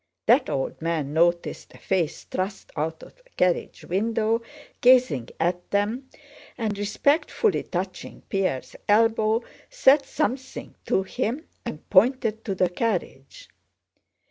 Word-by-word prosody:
That - - +4
old 135 +3 -3
man 160 -4 -1
noticed 170 +2 0
a - - -12
face 170 -5 -1
thrust 190 +2 -4
out 160 +1 -3
of - - -14
the - - -27
carriage 180 -1 0
window 225 +4 0 0.4
gazing 245 - +4
at 175 +1 -1
them, 220 +6 -1 0.5
and 220 -4 -1
respectfully 285 - +1
touching 185 +1 -5
Pierre's 185 -10 -2
elbow 220 +1 +3 0.3
said 290 - +5
something 265 -3 -3
to 190 - +2
him 255 - -3 0.2
and 150 - -7
pointed 220 +1 +3
to 195 - -2
the 180 -1 +2
carriage. 230 - -3
205 Hz, 120 wpm, -25 LUFS, 175-245 Hz, 0.5 s, said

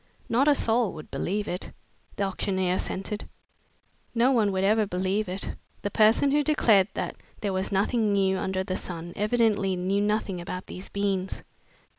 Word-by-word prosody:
"Not 255 +5 +2
a 295 - +6
soul 230 -4 +1
would 155 -1 -10
believe 205 +3 -2
it," 180 - -4 0.4
the 200 - -1
auctioneer 190 -1 0
assented. 195 +3 -3 0.9
"No 240 +3 +4
one 220 -6 +3
will 190 0 0
ever 215 +1 +3
believe 190 +2 -1
it. 190 +2 -3 0.3
The 205 - -2
person 225 +7 +4
who 295 +1 +3
declared 225 -11 +4
that - - -3 0.2
there 200 -2 -1
was 190 +2 -2
nothing 210 +2 +2
new 195 -1 +2
under 190 0 -1
the 185 0 -3
sun 175 -1 -6
evidently 210 -3 +2
knew 190 +3 0
nothing 205 -3 0
about 180 +1 -5
these 185 - -8
beans!" 195 -2 -2
200 Hz, 165 wpm, -27 LUFS, 190-215 Hz, 0.9 s, a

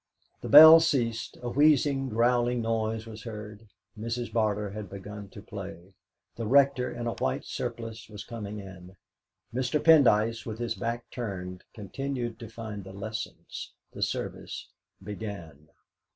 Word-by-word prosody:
The - - -5
bell 160 +1 +11
ceased; 120 -9 0
a 120 - -2
wheezing, 140 -1 +3
growling 120 +1 +2
noise 110 0 -1
was 110 -1 -9
heard. 105 -1 -8 0.3
Mrs. 115 +1 -4
Barter 105 -2 0
had 105 -2 -7
begun 100 +1 -8
to 100 - -11
play; 95 -2 -9 0.4
the 115 -2 -4
Rector, 135 0 +4
in 120 0 -5
a 115 - -1
white - - -2
surplice, 115 -2 -5
was 105 -1 -8
coming 105 -3 -6
in. 95 -2 -11 0.6
Mr. 130 +4 0
Pendyce, 115 -8 +5
with 110 -1 -6
his 120 0 -2
back 120 0 -4
turned, 90 -6 -5
continued 120 +2 -4
to 115 -3 -8
find 110 -3 -7
the 95 0 -10
Lessons. 110 +2 -6 0.2
The - - -8
service - - -4 0.3
began. 95 -8 -7
115 Hz, 140 wpm, -28 LUFS, 105-120 Hz, 0.6 s, bell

